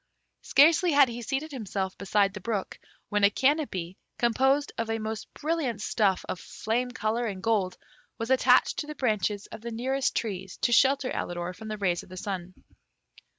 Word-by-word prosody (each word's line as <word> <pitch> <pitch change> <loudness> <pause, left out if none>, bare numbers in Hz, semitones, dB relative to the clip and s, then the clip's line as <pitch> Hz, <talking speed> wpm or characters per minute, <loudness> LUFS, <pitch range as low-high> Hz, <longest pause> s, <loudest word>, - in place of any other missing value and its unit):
Scarcely 325 +4 +5
had 280 -2 +6
he 240 +1 -6
seated 275 +6 -3
himself 195 -7 -3
beside 200 0 +1
the 205 - -7
brook, 210 -2 -3 0.3
when 205 0 +1
a 200 - +8
canopy, 205 - 0 0.2
composed 265 +5 +2
of 230 -1 -3
a 225 - 0
most 220 0 -5
brilliant 300 -8 -1
stuff 205 -3 +1
of 180 - -4
flame 235 +6 -2
colour 235 0 -1
and 190 -3 -5
gold 200 -5 +1 0.4
was 230 +2 -3
attached 260 - +4
to 295 - -4
the 300 - -6
branches 210 -6 0
of 220 - -8
the 235 - -5
nearest 255 +3 -1
trees 195 -5 -3
to 240 - +3
shelter 270 +2 +4
Alidor 175 +1 -3
from 220 +2 -9
the 215 0 -4
rays 180 -4 0
of - - -16
the 185 - -9
sun. 185 -2 -5
225 Hz, 180 wpm, -28 LUFS, 195-265 Hz, 0.4 s, a